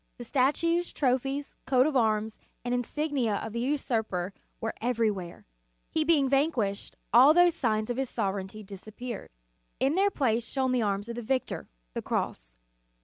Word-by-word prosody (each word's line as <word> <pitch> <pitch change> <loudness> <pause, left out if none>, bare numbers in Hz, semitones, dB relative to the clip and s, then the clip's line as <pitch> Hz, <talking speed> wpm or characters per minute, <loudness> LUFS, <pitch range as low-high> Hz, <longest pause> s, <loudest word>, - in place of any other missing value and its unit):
The 240 - -7
statues, 315 +8 +1
trophies, 270 +1 -1
coat 260 -1 +4
of 305 -2 0
arms, 220 -2 +1 0.3
and 245 - 0
insignia 245 -2 0
of 215 +2 -4
the 235 - -2
usurper 225 -8 -1 0.3
were 225 - -2
everywhere. 220 -7 -1 0.5
He 315 - +2
being 300 -4 +3
vanquished, 265 -8 0 0.2
all 265 +6 +8
those 350 -1 +6
signs 215 -4 0
of 240 - -3
his 265 -2 -1
sovereignty 195 +2 -3
disappeared. 215 +3 -8 0.5
In 270 +2 +2
their 390 +3 +3
place 235 - 0
shone 265 -2 0
the 250 -1 +2
arms 205 0 -1
of 235 0 -5
the - - -3
Victor, 255 +3 -2 0.2
the - - -3
cross. - - -3
245 Hz, 155 wpm, -28 LUFS, 215-275 Hz, 0.5 s, all